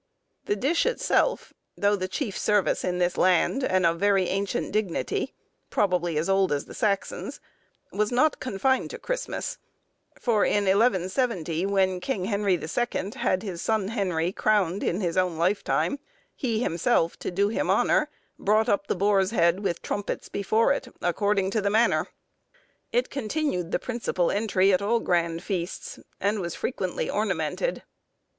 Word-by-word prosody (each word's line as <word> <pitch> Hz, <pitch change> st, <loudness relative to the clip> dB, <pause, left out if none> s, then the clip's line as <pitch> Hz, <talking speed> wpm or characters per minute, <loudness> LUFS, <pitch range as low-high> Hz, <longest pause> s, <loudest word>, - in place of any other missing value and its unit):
The 205 Hz, -, 0 dB
dish 285 Hz, -, +1 dB
itself, -, -, +1 dB, 0.2 s
though 205 Hz, 0 st, +3 dB
the 185 Hz, -2 st, -3 dB
"chief 200 Hz, +2 st, -3 dB
service 205 Hz, -3 st, +1 dB
in 180 Hz, 0 st, -1 dB
this 180 Hz, 0 st, 0 dB
land," 185 Hz, +9 st, +3 dB
and 185 Hz, -6 st, +2 dB
of 165 Hz, 0 st, +2 dB
very 200 Hz, -1 st, +3 dB
ancient 200 Hz, +5 st, -2 dB
dignity—probably 180 Hz, -3 st, -2 dB
as 155 Hz, -, 0 dB
old 195 Hz, -1 st, +2 dB
as 145 Hz, -1 st, -1 dB
the -, -, -11 dB
Saxons,—was 210 Hz, 0 st, -3 dB
not 290 Hz, +5 st, +2 dB
confined 260 Hz, +2 st, 0 dB
to 475 Hz, -, -6 dB
Christmas; -, -, -4 dB, 0.6 s
for, 220 Hz, -4 st, +2 dB
in 205 Hz, -, +2 dB
1170, 190 Hz, -, +1 dB
when 190 Hz, -2 st, +1 dB
King 190 Hz, -2 st, -2 dB
Henry 200 Hz, -2 st, +1 dB
the 165 Hz, -, -5 dB
Second 210 Hz, +1 st, -2 dB
had 185 Hz, +2 st, 0 dB
his 180 Hz, -5 st, -5 dB
son 215 Hz, -3 st, 0 dB
Henry 180 Hz, -6 st, -1 dB
crowned 200 Hz, -3 st, +1 dB
in 180 Hz, +5 st, -1 dB
his 175 Hz, -1 st, -1 dB
own 180 Hz, -3 st, +1 dB
lifetime, 200 Hz, -, 0 dB, 0.4 s
he 235 Hz, -3 st, -1 dB
himself, 170 Hz, -1 st, +1 dB
to -, -, -3 dB
do 200 Hz, +3 st, +1 dB
him 220 Hz, -, -1 dB
honour, -, -, +3 dB, 0.3 s
brought 215 Hz, +2 st, +2 dB
up 200 Hz, 0 st, +1 dB
the -, -, 0 dB
boar's 195 Hz, 0 st, +2 dB
head 170 Hz, -4 st, +2 dB
with 190 Hz, -4 st, -2 dB
trumpets 205 Hz, -, -3 dB
before 220 Hz, +6 st, +2 dB
it, 270 Hz, -, -4 dB, 0.2 s
"according 195 Hz, +2 st, +1 dB
to 220 Hz, -, 0 dB
the 200 Hz, -, +1 dB
manner." 220 Hz, +3 st, +2 dB, 0.8 s
It -, -, 0 dB
continued 275 Hz, -, -2 dB
the -, -, +2 dB
principal 225 Hz, -8 st, -1 dB
entry 200 Hz, -2 st, +2 dB
at 185 Hz, -, +2 dB
all 230 Hz, +4 st, +2 dB
grand 170 Hz, -3 st, 0 dB
feasts, 180 Hz, -4 st, -4 dB, 0.2 s
and 205 Hz, +2 st, 0 dB
was 170 Hz, -3 st, -4 dB
frequently 185 Hz, -8 st, -2 dB
ornamented. 205 Hz, -, -1 dB
200 Hz, 155 wpm, -26 LUFS, 180-220 Hz, 0.8 s, though